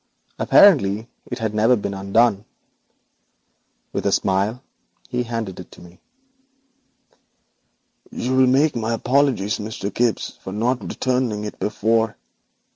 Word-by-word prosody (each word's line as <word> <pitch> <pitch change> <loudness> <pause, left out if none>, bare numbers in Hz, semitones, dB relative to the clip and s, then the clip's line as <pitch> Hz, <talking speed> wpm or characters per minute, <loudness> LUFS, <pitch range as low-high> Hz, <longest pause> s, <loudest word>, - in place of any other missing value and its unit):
Apparently 115 - +5 0.2
it 120 - -4
had 110 -3 -3
never 110 +4 +4
been 100 -3 -4
opened. 100 +2 +1 1.5
With - - -2
a - - +2
smile 100 +6 0 0.5
he 125 -1 -1
handed 115 -5 -4
it - - -10
to - - -15
me. 90 0 -16 2.1
'You 130 +2 -2
will 130 0 +5
make 140 +4 +3
my 115 0 -1
apologies 125 -4 +1
to - - -7
Mr. 105 -2 -5
Gibbes 120 -2 -1
for 95 - -7
not 120 +3 0
returning 125 -2 -2
it 105 - -7
before. 110 +1 0
115 Hz, 125 wpm, -21 LUFS, 105-125 Hz, 2.1 s, Apparently